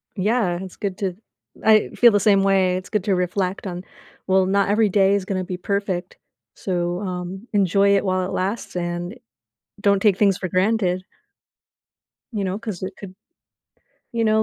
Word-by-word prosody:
Yeah, 205 -3 +1
it's 190 -1 -8
good 195 -2 -4
to 190 -3 -2 0.5
I 215 -1 +5
feel 240 -1 +6
the 205 - +3
same 195 -1 +4
way, 190 -2 +3
it's 185 0 -8
good 210 -4 -1
to 200 -3 +2
reflect 180 +2 -2
on, 180 -1 -5 0.4
well, 190 0 +4
not 200 +1 +1
every 210 0 +3
day 195 0 +3
is 200 -2 -2
gonna 185 -1 -2
be 180 0 -5
perfect, 195 -1 -3 0.4
so, 175 -1 -2
um, 185 +2 -5
enjoy 200 0 +3
it 195 - +1
while 185 -1 0
it - - -6
lasts 195 +4 -3
and 175 +4 -3 0.6
don't 200 -1 +3
take 205 -4 +4
things 200 -3 +3
for 185 - -3
granted. 185 0 +1 1.3
You 210 -3 -2
know, 190 +2 -2
'cause 215 -6 -6
it 190 0 -5
could 190 -2 -10 1.0
you 230 -1 0
know, 220 0 +3
195 Hz, 175 wpm, -22 LUFS, 185-205 Hz, 1.3 s, feel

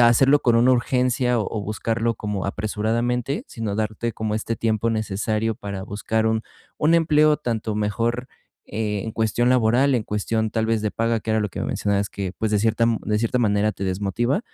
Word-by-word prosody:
hacerlo 130 +5 +5
con 120 -2 +3
una 125 +2 +5
urgencia 125 0 +1
o 110 0 -2
buscarlo 115 +2 -1
como 105 -2 -3
apresuradamente, 115 +5 -1
sino 110 -3 -4
darte 110 +2 -2
como 110 -1 -3
este 110 +1 -2
tiempo 115 0 0
necesario 110 +1 -1
para 100 -1 -6
buscar 110 +2 -1
un 110 0 +1 0.3
un 155 +2 +3
empleo 155 -2 +4
tanto 115 -6 -3
mejor, 115 +4 -1 0.4
eh, 105 -1 -2
en 110 - -5
cuestión 115 +2 +1
laboral, 125 +3 +3
en 115 -4 0
cuestión 110 +1 -1
tal 110 0 0
vez 110 -1 +1
de 105 - -1
paga, 115 +1 0
que 110 - -4
era 110 - +2
lo 105 -1 -2
que - - -6
mencionabas 100 -1 0
que, 95 -2 -4
pues, 110 - 0
de 105 - +2
cierta 115 +2 +2 0.2
de 105 0 0
cierta 115 +2 0
manera 105 -2 +2
te 95 - -5
desmotiva, 100 - 0
110 Hz, 185 wpm, -23 LUFS, 105-120 Hz, 0.4 s, hacerlo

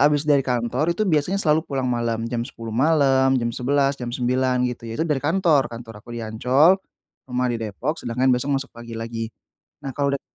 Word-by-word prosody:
habis 145 +1 +4
dari 145 -2 +4
kantor, 125 +6 0
itu 215 - +1
biasanya 170 0 +1
selalu 160 -5 +3
pulang 135 -2 -1
malam. 120 -2 -1
Jam 115 0 -2
22.00 115 -3 -8
malam, 135 0 +3
jam 120 -2 -1
23.00, 140 +2 +1
jam 120 - -3
21.00, 125 +1 +1
gitu 120 -2 -4
ya. 115 - -5
Itu 160 - 0
dari 150 -5 0
kantor. 155 -2 +2
Kantor 115 -2 -9
aku - - -24
di 115 - -4
Ancol, 130 - +3 0.5
rumah 125 0 0
di - - -1
Depok, 115 +9 -3
sedangkan 125 +2 +1
besok 135 +3 +1
masuk 135 +1 -5
pagi 115 -1 -9
lagi. 115 0 -4 0.6
Nah, 135 - -4
kalau 140 +1 0
udah - - -16
130 Hz, 205 wpm, -23 LUFS, 120-145 Hz, 0.6 s, habis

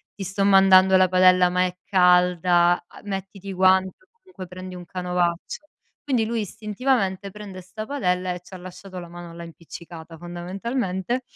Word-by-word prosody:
ti 195 - -6
sto 195 +2 -2
mandando 190 -1 +6
la 185 0 +5
padella 185 -1 +5
ma 180 0 +1
è 180 0 -4
calda, 180 -1 +3 0.2
uhm, - - -17
mettiti 195 0 -6
i 195 - -4
guanti 185 0 +3
o 370 - -29
comunque 370 - -11
prendi 185 +1 -9
un 175 -1 -9
canovaccio". 180 - -3 0.4
Quindi 250 -6 0
lui 230 0 -2
istintivamente 205 -1 -2
prende 200 -3 -9
'sta 215 +4 -8
padella 185 -9 -1
e 180 - -7
ci 185 - -17
ha - - -6
lasciato 185 +1 -10
la 175 - -9
mano 175 -1 -10
là 170 0 -9
impiccicata 165 0 -11
fondamentalmente. 190 +6 -3
185 Hz, 170 wpm, -23 LUFS, 180-195 Hz, 0.4 s, mandando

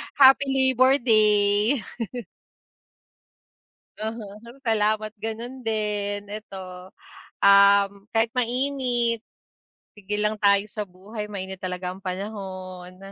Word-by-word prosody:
Happy 270 0 +7 0.3
Labor 260 +2 +6
Day. 210 0 +3 2.1
Aha, 220 0 -4 0.4
salamat 215 -2 0
gano'n 230 +4 -6
din, 205 -2 -2
eto, 210 -2 -8 0.9
um, 200 0 +7 0.2
kahit 225 0 +2
mainit 250 -2 0 0.7
sigel 210 0 -4
lang 215 - +1
tayo 200 0 +4
sa 215 0 -5
buhay, 210 +4 -8
mainit 190 -2 -6
talaga 180 0 -4
ang 190 - -14
panahon. 185 -2 -6
210 Hz, 90 wpm, -24 LUFS, 200-230 Hz, 2.1 s, Happy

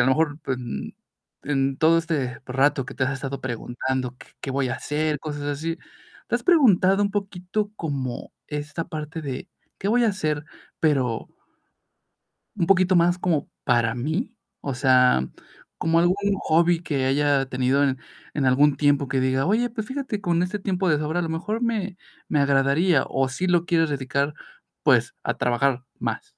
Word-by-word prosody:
lo - - +3
mejor, 150 +2 +2
pues, 130 -1 -2
n 120 -2 -6 0.5
en 135 -1 0
todo 165 +1 +5
este 145 -7 -2
rato 135 +1 +2
que 135 - -8
te 130 - 0
has 135 - 0
estado 135 0 -5
preguntando: 125 +1 -3
"¿Qué - - -14
qué 135 - -4
voy 135 -1 0
a 120 - -1
hacer?", 150 0 -1
cosas 145 -2 -5
así. 155 +3 -3 0.5
Te - - -1
has - - 0
preguntado, 205 - +5
un 200 - 0
poquito 200 +1 -2
como 135 -6 -4
esta 150 +3 -4
parte 155 +1 -5
de: 135 -3 -5 0.3
"Qué 195 - -2
voy 240 +2 +3
a - - +4
hacer?", 155 -7 -1 0.4
pero 130 -7 +1 1.3
"un 170 - +1
poquito 185 -1 +4
más 175 +1 +4
como, 170 -5 0
para 120 -1 +2
mí", 160 - -2 0.3
o 140 - -3
sea, 125 - +4 0.5
como 165 +1 +2
algún 175 +2 +3 0.3
hobby 170 +1 +3
que 140 -6 -1
haya 140 0 +2
tenido 130 +2 +1
en 135 -2 +1 0.4
en 140 -3 0
algún 140 +3 +4
tiempo 145 -2 +2
que 135 0 0
diga: 130 +1 +1
"Oye, 230 +6 +2
pues, 220 -2 -5
fíjate 260 -6 -4
con 175 -2 +1
este 200 +3 -3
tiempo 190 -1 0
de 150 - +3
sobra, 155 +3 -1
a - - +1
lo 165 - -3
mejor 205 +8 -3
me 210 -5 -1 0.3
me 150 - +1
agradaría", 140 +3 +3
¿o 135 -1 +1
sí 160 +9 -2
lo 175 -1 +3
quieres 165 -2 +2
dedicar, 140 +1 -1 0.5
pues, - - +3
a - - -2
trabajar 125 +1 +1 0.2
más? - - -3
150 Hz, 175 wpm, -24 LUFS, 135-175 Hz, 1.3 s, todo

